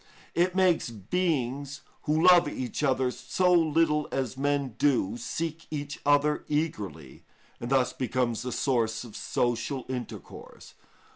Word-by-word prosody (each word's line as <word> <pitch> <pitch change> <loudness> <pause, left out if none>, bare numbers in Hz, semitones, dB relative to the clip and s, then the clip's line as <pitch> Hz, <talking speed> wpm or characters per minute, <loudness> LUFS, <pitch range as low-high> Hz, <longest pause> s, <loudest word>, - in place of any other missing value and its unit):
It 180 +2 +1
makes 185 -7 +3
beings 140 - -2 0.2
who 155 +4 +3
love 175 -1 +7
each 130 +2 -4
other 130 -3 +2
so 130 +9 +1
little 160 -2 +3
as 130 -3 -2
men 140 0 0
do, 120 -8 +2
seek 160 +7 -4
each 145 -2 -5
other 145 +1 +3
eagerly, 105 - -3 0.4
and 120 - -5
thus 130 -2 +2
becomes 125 -2 -1
the 125 - -4
source 115 -5 0
of 120 -3 -11
social 120 +2 -1
intercourse. 125 -3 -8
140 Hz, 130 wpm, -28 LUFS, 125-155 Hz, 0.4 s, love